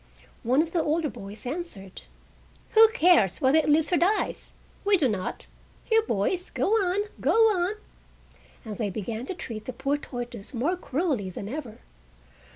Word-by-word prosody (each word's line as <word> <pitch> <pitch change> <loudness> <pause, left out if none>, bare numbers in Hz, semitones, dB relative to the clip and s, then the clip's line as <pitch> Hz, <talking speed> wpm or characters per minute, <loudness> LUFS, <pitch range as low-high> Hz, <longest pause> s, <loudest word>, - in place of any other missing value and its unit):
One 260 +6 +3
of 330 - -8
the 340 - +1
older 310 -1 0
boys 210 -1 -10
answered: 245 - -6 0.7
"Who 445 0 +8
cares 340 - +4
whether 275 +2 +4
it 305 - 0
lives 305 +3 +3
or - - +5
dies? 385 +6 0 0.3
We 405 -1 +4
do 295 -6 +2
not. 195 -5 -2 0.4
Here, 450 -1 +4
boys, 360 - -1
go - - -1
on, 400 -3 +2 0.2
go - - +2 0.2
on!" 370 +1 0 0.9
And 210 -3 -6
they 210 -3 0
began 220 +5 -5
to 380 - -4
treat 220 -10 -7
the 255 - -5
poor 275 +4 -1
tortoise 245 -5 -7
more 290 +10 +1
cruelly 285 - -1
than 195 +2 -7
ever. 255 -2 -7
285 Hz, 165 wpm, -26 LUFS, 220-350 Hz, 0.9 s, Who